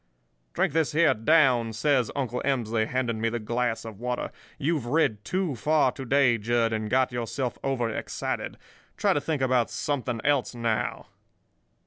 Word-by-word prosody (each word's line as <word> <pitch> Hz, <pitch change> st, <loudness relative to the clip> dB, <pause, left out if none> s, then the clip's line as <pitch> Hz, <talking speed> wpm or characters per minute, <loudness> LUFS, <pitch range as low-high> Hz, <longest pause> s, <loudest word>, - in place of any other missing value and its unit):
"'Drink -, -, +1 dB
this 160 Hz, -1 st, +1 dB
here 160 Hz, 0 st, +4 dB
down,' 125 Hz, -2 st, +3 dB
says 130 Hz, 0 st, +2 dB
Uncle 125 Hz, -3 st, -2 dB
Emsley, 115 Hz, -5 st, 0 dB
handing 120 Hz, -3 st, -1 dB
me 115 Hz, -, +2 dB
the 120 Hz, -, -2 dB
glass 120 Hz, +1 st, -2 dB
of 110 Hz, -3 st, -8 dB
water. 125 Hz, +1 st, -3 dB, 0.3 s
'You've 150 Hz, -4 st, -1 dB
rid 125 Hz, -7 st, +1 dB
too 185 Hz, -, -1 dB
far 145 Hz, +2 st, +2 dB
to 135 Hz, -, -8 dB
day, 130 Hz, -3 st, +3 dB
Jud, 115 Hz, +1 st, +1 dB
and 110 Hz, -1 st, -2 dB
got 130 Hz, +1 st, +2 dB
yourself 120 Hz, +1 st, -3 dB
over 130 Hz, -3 st, 0 dB
excited. 115 Hz, -, -4 dB, 0.4 s
Try -, -, +3 dB
to 145 Hz, -, 0 dB
think 150 Hz, -4 st, -1 dB
about 125 Hz, -2 st, +2 dB
something 130 Hz, -5 st, -2 dB
else 140 Hz, -4 st, +1 dB
now. 115 Hz, -2 st, -1 dB
125 Hz, 160 wpm, -26 LUFS, 115-140 Hz, 0.4 s, here